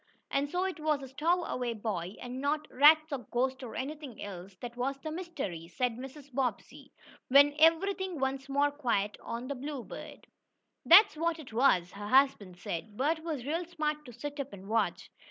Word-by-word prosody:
"And 280 +1 0
so 360 +4 0
it 375 -3 -3
was 305 -2 0
a - - -7
stowaway 295 -5 0
boy, 205 -4 -4
and 250 +1 -6
not 300 +2 0
rats 310 +3 +6
or 280 - -1
ghosts 260 +2 0
or 245 -3 -7
anything 285 -3 -6
else 190 -1 -8
that 240 +4 -8
was 265 +3 -2
the 310 +2 -5
mystery," 300 - -5
said 245 +6 -1
Mrs. 270 +2 -10
Bobbsey, 250 -5 -3 0.4
when 285 +2 +6
everything 365 +2 +3
once 270 +1 -2
more 285 +1 +2
quiet 230 -8 -1
on 235 +2 -5
the 280 - -2
Bluebird. 275 -1 -7 0.6
"That's 405 +3 +8
what 335 +1 0
it 295 -8 -11
was," 210 -8 +3
her 205 +1 -7
husband 235 -8 +3
said 205 +5 -6
"Bert 310 +5 +1
was 305 -7 -4
real 325 +5 -1
smart 305 -3 -2
to 245 - -10
sit 290 +5 -7
up 280 0 -4
and 195 0 -10
watch." 225 +2 -1
275 Hz, 180 wpm, -31 LUFS, 235-305 Hz, 0.6 s, That's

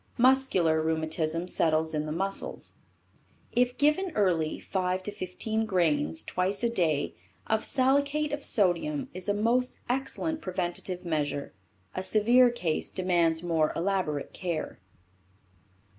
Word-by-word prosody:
Muscular 235 -11 +3
rheumatism 160 +1 -1
settles 160 -2 +1
in 155 0 -1
the - - -3
muscles. 195 +5 -3 0.8
If 245 +1 +1
given 305 +6 +2
early 175 -6 +1
5 185 -1 -2
to 210 - -4
15 215 +3 -2
grains, 155 - +1
twice 190 +4 -1
a 235 - +3
day, 155 - 0 0.3
of 220 0 0
salicate 285 +3 +2
of 290 - -3
sodium 170 -7 +1
is 185 +2 -5
a - - +3
most 240 +4 +1
excellent 275 +5 -2
preventative 180 0 -3
measure. 145 -4 -2 0.4
A - - -3
severe 230 +6 +4
case 180 -10 -2
demands 175 -3 +1
more 160 -3 +1
elaborate 170 -5 -1
care. 170 - -4
185 Hz, 125 wpm, -28 LUFS, 160-235 Hz, 0.8 s, severe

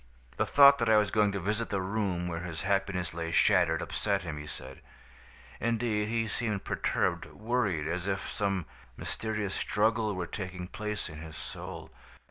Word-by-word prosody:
The - - +1
thought 140 0 +8
that 115 -1 +2
I 110 - +7
was 105 -1 +3
going 105 -2 +3
to 100 - -2
visit 105 +5 -1
the 100 - 0
room 95 -2 -1
where 85 -1 -3
his 85 -2 -5
happiness 95 -3 0
lay 85 0 -3
shattered, 85 -1 +4
upset 100 -2 -1
him, 80 -4 -5
he 75 - -8
said. 65 -2 -8 0.8
Indeed, 115 -2 0
he 115 0 0
seemed 105 -2 -2
perturbed, 85 -1 0
worried, 105 -8 -1
as 90 +2 -2
if 95 0 0
some 100 -4 -1 0.3
mysterious 105 -3 -2
struggle 110 0 +1
were 90 -1 -2
taking 90 0 -5
place 105 +2 -3
in 80 -2 -9
his 80 0 -9
soul. - - -7
100 Hz, 170 wpm, -30 LUFS, 90-110 Hz, 0.8 s, thought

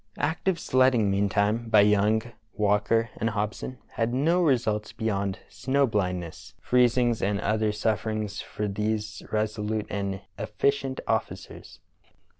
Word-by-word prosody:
Active 165 +4 0
sledging, 130 -7 +3
meantime, 100 +3 +1
by 110 -2 +6
Young, 105 +2 +3 0.3
Walker, 105 +2 +1
and 115 - 0
Hobson, 110 +4 -3 0.2
had 115 +1 0
no 165 +7 +2
results 115 -9 +1
beyond 100 -4 -1
snow 140 +1 +1
bhndness, 90 -6 -3
freez 125 -1 +3
ings, 120 -2 +2
and 100 0 0
other 110 +1 +1
suffering 110 0 -1
for 105 +1 -5
these 105 +1 -2
resolute 110 0 -1
and 100 -1 -3 0.2
effi 140 - +1
cient 135 -2 -5
officers. - - -4
110 Hz, 125 wpm, -26 LUFS, 105-120 Hz, 0.3 s, by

